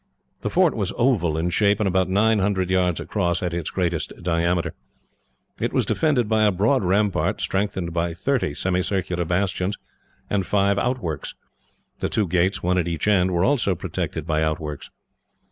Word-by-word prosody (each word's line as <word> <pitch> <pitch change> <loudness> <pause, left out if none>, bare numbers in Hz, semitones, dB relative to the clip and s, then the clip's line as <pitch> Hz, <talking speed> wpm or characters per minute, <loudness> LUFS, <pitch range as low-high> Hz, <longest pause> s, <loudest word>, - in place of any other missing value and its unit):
The - - -2
fort - - +3
was - - -1
oval 95 -11 +2
in 85 +2 0
shape, 100 +2 +2
and 105 - +1
about 95 0 +1
nine 105 +3 +3
hundred 95 -2 0
yards 90 -2 +2
across, 90 -4 -1
at 90 -1 -2
its 85 -3 -2
greatest 85 -3 -1
diameter. 85 0 0 0.9
It - - -1
was - - +2
defended 140 -8 +1
by 110 0 +2
a 105 - +4
broad 105 +7 +2
rampart, 100 +2 +1
strengthened 95 -3 -2
by 85 0 -1
thirty 100 - -1
semicircular 90 0 -1
bastions 90 +2 -1 0.5
and 100 -2 0
five 100 0 +2
outworks. 105 - -3 0.6
The - - -1
two 105 -3 0
gates, 90 +3 +1
one 90 +1 +2
at 85 - -1
each 85 +3 -2
end, 95 -3 +3
were 90 0 +1
also 125 -9 +2
protected 80 -1 -4
by 80 -2 0
outworks. 75 -2 -3
95 Hz, 165 wpm, -23 LUFS, 85-105 Hz, 0.9 s, a